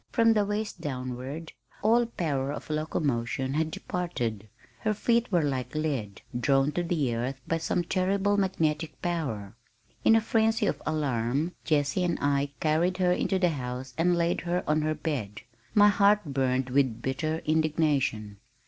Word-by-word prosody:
From 230 -1 +4
the 210 -2 +2
waist 210 +1 -3
downward 130 +3 -5 0.3
all 230 +2 +4
power 145 -10 -2
of 150 - -6
locomotion 135 -4 -1
had 155 +2 +1
departed. 120 - -3 0.3
Her 215 -1 0
feet 235 +2 +1
were 175 -4 +3
like 135 -1 -2
lead, 135 -11 -2 0.2
drawn 135 +2 +3
to 175 - -1
the 160 -8 0
earth 125 +4 -3
by 165 - 0
some 170 +2 0
terrible 195 +3 +1
magnetic 165 -5 0
power. 135 - -2 0.5
In 225 - +6
a - - +6
frenzy 225 0 +2
of - - -1
alarm, 140 0 0
Jessie 150 +3 +1
and 175 -1 0
I 140 0 +1
carried 165 +4 +1
her 180 -1 +3
into 190 +2 +1
the 180 -2 +3
house 125 -3 -5
and 175 +2 +2
laid 170 0 +1
her 175 +1 -1
on 155 +1 +2
her 155 0 0
bed. 110 -12 -4 0.3
My 205 0 +7
heart 205 0 +4
burned 130 -2 0
with 130 -4 +1
bitter 155 +4 -2
indignation. 150 -9 +1
155 Hz, 155 wpm, -28 LUFS, 130-180 Hz, 0.5 s, My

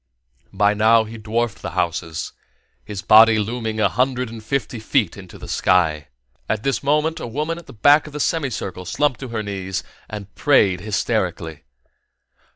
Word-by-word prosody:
By 105 +1 +2
now 110 +2 +4
he 110 +1 -9
dwarfed 115 0 -2
the - - -6
houses, 85 -1 -2 0.5
his 105 -1 -7
body 110 +1 +7
looming 110 +1 -2
a 110 - +4
hundred 125 -1 -1
and 115 -1 -9
fifty 120 -1 -2
feet 110 -4 0
into 95 -3 -12
the - - -10
sky. 80 -5 +1 0.4
At 110 0 -1
this 135 -5 0
moment 150 +4 +1
a - - -5
woman 155 +8 -3 0.2
back 145 +2 +6
of 150 - -11
the 150 - -5
semicircle 120 - -2
slumped 140 +8 0
to 130 - -6
her 115 -2 -3
knees 95 -2 -4 0.3
and 105 -1 -8
prayed 100 -11 +3
hysterically. 85 -5 -2
110 Hz, 160 wpm, -21 LUFS, 100-130 Hz, 0.5 s, body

